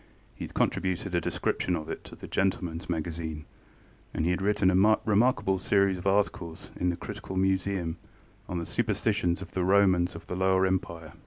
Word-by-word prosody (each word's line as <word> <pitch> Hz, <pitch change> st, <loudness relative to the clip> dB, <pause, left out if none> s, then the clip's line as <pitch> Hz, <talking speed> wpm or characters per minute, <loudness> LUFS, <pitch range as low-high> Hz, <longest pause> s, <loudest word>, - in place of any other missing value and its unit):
He -, -, -6 dB
had -, -, -13 dB
contributed 95 Hz, 0 st, 0 dB
a 85 Hz, -, +2 dB
description 90 Hz, +1 st, -1 dB
of 80 Hz, -2 st, -5 dB
it -, -, -5 dB
to -, -, -10 dB
the -, -, -10 dB
GentlemanŌĆÖs 90 Hz, -3 st, -1 dB
Magazine, 80 Hz, -2 st, -3 dB, 0.7 s
and 80 Hz, -, 0 dB
he 85 Hz, -, +2 dB
had 90 Hz, -, -1 dB
written 100 Hz, -1 st, +3 dB
a 105 Hz, +4 st, +4 dB
remarkable 100 Hz, -3 st, +2 dB
series 100 Hz, -1 st, +2 dB
of 90 Hz, -, -4 dB
articles 95 Hz, -4 st, -1 dB
in 90 Hz, -, 0 dB
the 85 Hz, -, -2 dB
Critical 95 Hz, -, -7 dB
Museum 95 Hz, -3 st, 0 dB, 0.5 s
on 90 Hz, -, -2 dB
the 85 Hz, -, -3 dB
superstitions 105 Hz, -5 st, 0 dB
of 85 Hz, -, -12 dB
the 90 Hz, -, -1 dB
Romans 95 Hz, -2 st, +3 dB
of 85 Hz, -, -9 dB
the 90 Hz, -, -5 dB
Lower 95 Hz, 0 st, +3 dB
Empire. 85 Hz, -4 st, -2 dB
95 Hz, 180 wpm, -28 LUFS, 85-100 Hz, 0.7 s, a